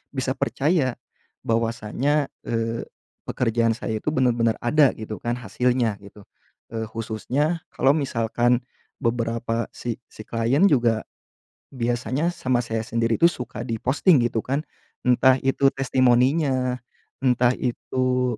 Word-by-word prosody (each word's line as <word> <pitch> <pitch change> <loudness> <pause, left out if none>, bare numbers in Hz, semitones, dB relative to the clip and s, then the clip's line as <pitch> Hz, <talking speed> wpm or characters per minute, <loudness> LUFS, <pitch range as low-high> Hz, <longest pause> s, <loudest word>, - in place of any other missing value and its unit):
bisa 130 0 -1
percaya, 140 -4 +1 0.5
bahwasanya, 115 +6 0 0.2
eee, 115 0 -2 0.4
pekerjaan 115 -1 +1
saya 110 -2 -3
itu - - -1
benar-benar 120 -4 +2
ada, 145 +3 +4
gitu 110 -2 -7
kan, 120 0 -1
hasilnya 125 -3 0
gitu. 100 0 -14 0.5
Eee, 110 0 -2
khususnya, 125 +9 -2
kalau 135 - +2
misalkan, 120 -2 +1 0.4
beberapa 115 0 -1
si 120 -2 -4
si - - -13
klien 115 - 0
juga, 120 -5 +2 0.7
biasanya 130 +6 -1
sama 125 -5 0
saya 115 -1 -2
sendiri 115 +2 -1
itu 170 - +7
suka 125 -7 -7
di 115 -3 -2
posting 150 +5 +4
gitu 115 -2 -1
kan. 140 +3 0 0.4
Entah 130 +1 +5
itu 135 +1 +3
testimoninya, 130 0 +2 0.5
entah 125 -1 +4
itu, 125 0 -1
120 Hz, 120 wpm, -24 LUFS, 115-130 Hz, 0.7 s, itu